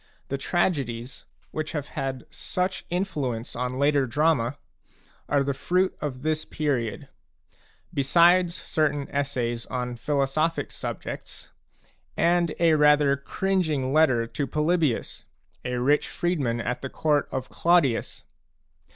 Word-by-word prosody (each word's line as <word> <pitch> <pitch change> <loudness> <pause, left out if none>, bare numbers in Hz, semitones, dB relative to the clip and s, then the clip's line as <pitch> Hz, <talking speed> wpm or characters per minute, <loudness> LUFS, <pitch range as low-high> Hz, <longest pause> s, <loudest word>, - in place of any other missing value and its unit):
The 140 - -1
tragedies, 135 -8 -1 0.3
which 155 0 -4
have 150 -2 -3
had 130 -1 -4
such 185 +1 -2
influence 145 - -2
on 125 +1 -2
later 140 -1 +3
drama, 140 -1 +1 0.7
are 140 -1 +3
the 140 0 -1
fruit 180 +7 +1
of 130 -3 -4
this 155 0 0
period, 130 -8 -2 0.9
besides 170 +5 +4
certain 145 -5 -1
essays 125 -4 -2
on 125 -1 -3
philosophic 145 +5 0
subjects, - - -7 0.7
and 170 -1 +2
a 165 -1 +5
rather 150 -2 +5
cringing 155 -3 -1
letter 130 -7 +4
to 140 +4 -3
Polybius, 155 -2 0 0.4
a 125 -1 -2
rich 135 +5 +2
freedman 140 -10 -1
at 120 +2 -2
the 135 - -4
court 150 0 +1
of 130 -1 -4
Claudius. 170 -9 +2
145 Hz, 115 wpm, -26 LUFS, 130-160 Hz, 0.9 s, a